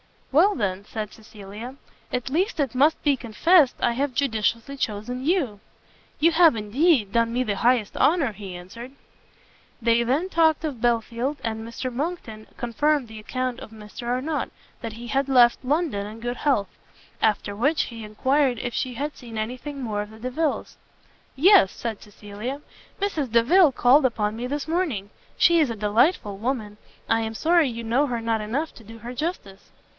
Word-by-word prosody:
"Well, 360 Hz, +9 st, +4 dB
then," 200 Hz, -4 st, -2 dB
said 215 Hz, -1 st, -5 dB
Cecilia, 215 Hz, +3 st, -10 dB, 0.4 s
"at 250 Hz, +1 st, -2 dB
least 350 Hz, -, 0 dB
it 275 Hz, -5 st, 0 dB
must 290 Hz, +5 st, +2 dB
be 285 Hz, -2 st, +3 dB
confessed 270 Hz, -, +3 dB
I 240 Hz, -, +3 dB
have 265 Hz, +1 st, -2 dB
judiciously 235 Hz, 0 st, -1 dB
chosen 245 Hz, +3 st, -3 dB
you!" 290 Hz, -, 0 dB, 0.6 s
"You 330 Hz, +3 st, +5 dB
have, 325 Hz, -4 st, +5 dB
indeed, 225 Hz, -, +2 dB
done 230 Hz, +1 st, +1 dB
me 250 Hz, +1 st, +1 dB
the 205 Hz, -4 st, -2 dB
highest 235 Hz, -2 st, +1 dB
honour," 305 Hz, -7 st, +3 dB
he 195 Hz, -3 st, -8 dB
answered. 230 Hz, +9 st, -10 dB, 0.9 s
They 230 Hz, 0 st, +3 dB
then 280 Hz, +10 st, 0 dB
talked 320 Hz, -3 st, +3 dB
of 280 Hz, -8 st, -4 dB
Belfield, 240 Hz, +4 st, 0 dB
and 225 Hz, 0 st, -4 dB
Mr 250 Hz, +2 st, -5 dB
Monckton 245 Hz, -7 st, -5 dB
confirmed 260 Hz, +2 st, 0 dB
the 220 Hz, -1 st, -9 dB
account 255 Hz, +3 st, -3 dB
of -, -, -10 dB
Mr 220 Hz, +2 st, -10 dB
Arnott, 260 Hz, +6 st, -1 dB, 0.3 s
that 230 Hz, -4 st, -5 dB
he 235 Hz, +2 st, -9 dB
had 275 Hz, +3 st, 0 dB
left 245 Hz, -2 st, +5 dB
London 280 Hz, -, 0 dB
in 215 Hz, +2 st, -9 dB
good 245 Hz, +1 st, -3 dB
health. 215 Hz, -10 st, +1 dB, 0.5 s
After 210 Hz, -2 st, +1 dB
which, 285 Hz, +9 st, +2 dB
he 230 Hz, -2 st, -8 dB
enquired 260 Hz, +5 st, +1 dB
if 240 Hz, +2 st, -4 dB
she 255 Hz, -2 st, -2 dB
had 290 Hz, +4 st, -4 dB
seen 235 Hz, -3 st, -9 dB
any 220 Hz, +4 st, -3 dB
thing 285 Hz, +1 st, -7 dB
more 210 Hz, -3 st, -2 dB
of 210 Hz, -, -7 dB
the 220 Hz, -, -13 dB
Delviles? 275 Hz, +6 st, -2 dB, 0.6 s
"Yes," 310 Hz, -, +6 dB
said 225 Hz, -3 st, -5 dB
Cecilia, 210 Hz, +6 st, -7 dB, 0.4 s
"Mrs. 315 Hz, -, -1 dB
Delvile 285 Hz, +7 st, +5 dB
called 260 Hz, +5 st, +5 dB
upon 215 Hz, -4 st, 0 dB
me 245 Hz, +2 st, -3 dB
this 285 Hz, +3 st, -3 dB
morning. 310 Hz, -, -1 dB, 0.3 s
She 340 Hz, -1 st, +5 dB
is 300 Hz, -5 st, +3 dB
a 230 Hz, -, -3 dB
delightful 210 Hz, -, +1 dB
woman; 220 Hz, -2 st, -3 dB, 0.3 s
I 225 Hz, -, +3 dB
am 220 Hz, 0 st, -4 dB
sorry 330 Hz, +4 st, +3 dB
you 235 Hz, -1 st, -6 dB
know 245 Hz, +6 st, +1 dB
her 240 Hz, -3 st, -3 dB
not 225 Hz, -1 st, 0 dB
enough 265 Hz, +10 st, -3 dB
to 225 Hz, -, -14 dB
do 225 Hz, +2 st, -12 dB
her 240 Hz, +3 st, -7 dB
justice." 250 Hz, -, -5 dB
240 Hz, 175 wpm, -24 LUFS, 220-285 Hz, 0.9 s, Yes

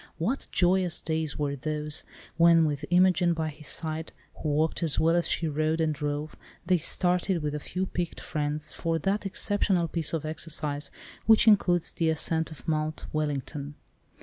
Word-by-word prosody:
What 220 Hz, +12 st, -2 dB
joyous 180 Hz, -1 st, +2 dB
days 160 Hz, -1 st, -2 dB
were 145 Hz, -1 st, -1 dB
those, 150 Hz, +2 st, -3 dB, 0.3 s
when 165 Hz, -1 st, +5 dB
with 150 Hz, -1 st, -2 dB
Imogen 180 Hz, -1 st, +4 dB
by 160 Hz, -1 st, -2 dB
his 150 Hz, 0 st, -10 dB
side, 160 Hz, 0 st, 0 dB, 0.2 s
who 155 Hz, -, -3 dB
walked 155 Hz, +4 st, +1 dB
as 160 Hz, -4 st, +2 dB
well 165 Hz, +1 st, +3 dB
as 175 Hz, -, +1 dB
she 165 Hz, -, 0 dB
rode 155 Hz, +2 st, 0 dB
and 160 Hz, -1 st, +1 dB
drove, 150 Hz, +1 st, -4 dB, 0.3 s
they 180 Hz, 0 st, +3 dB
started 180 Hz, +1 st, +2 dB
with 150 Hz, -1 st, -2 dB
a 150 Hz, -, -3 dB
few 180 Hz, +5 st, -3 dB
picked 175 Hz, -3 st, -4 dB
friends 150 Hz, 0 st, -3 dB
for 165 Hz, -1 st, -1 dB
that 195 Hz, +5 st, -1 dB
exceptional 195 Hz, -3 st, +1 dB
piece 165 Hz, -1 st, -2 dB
of 160 Hz, -2 st, -3 dB
exercise, 155 Hz, -2 st, -2 dB, 0.4 s
which 225 Hz, +1 st, +6 dB
includes 180 Hz, -5 st, +4 dB
the 165 Hz, -1 st, 0 dB
ascent 160 Hz, 0 st, +1 dB
of 155 Hz, -, -12 dB
Mount 155 Hz, -1 st, -2 dB
Wellington. 145 Hz, -1 st, -3 dB
160 Hz, 170 wpm, -27 LUFS, 150-175 Hz, 0.4 s, which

